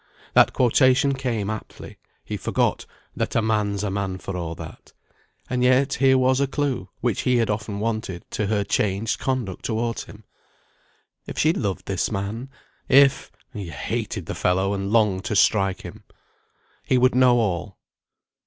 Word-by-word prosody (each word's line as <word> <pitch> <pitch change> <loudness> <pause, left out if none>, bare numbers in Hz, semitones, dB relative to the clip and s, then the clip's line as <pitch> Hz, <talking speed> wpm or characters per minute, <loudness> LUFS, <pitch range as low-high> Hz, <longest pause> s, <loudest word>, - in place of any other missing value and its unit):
That - - +6
quotation 130 +2 +3
came 120 -6 -2
aptly; 110 - -9 0.3
he - - -4
forgot - - -1 0.3
"That - - -2
a 115 - +3
man's 105 -2 0
a 105 - -1
man 95 -1 -2
for 95 0 -6
a' 85 -2 -4
that." - - -11 0.5
And 125 -1 -1
yet 130 +2 +3
here 130 -1 +4
was 130 0 +3
a 140 - +2
clue, 135 -9 -2
which 120 -4 0
he 125 -1 +2
had 115 -2 +1
often 105 -1 -4
wanted, 110 -5 -3
to 105 - -1
her 105 -1 +1
changed 100 +2 -1
conduct 125 -8 -2
towards 115 0 -2
him. 105 +1 -14 1.0
If - - -7
she 155 +1 +3
loved 100 - -3
this 95 -2 -1
man. 110 +6 -4 0.4
If 140 0 +5 0.2
he 100 -6 -6
hated 75 - -4
the - - -4
fellow, 95 +2 +1
and 100 0 -3
longed 105 -4 +2
to 105 - -2
strike 95 -1 +3
him. - - -10 0.8
He 130 - +2
would 130 +1 +4
know 125 -1 +5
all. 100 -3 -1
110 Hz, 160 wpm, -23 LUFS, 100-125 Hz, 1.0 s, That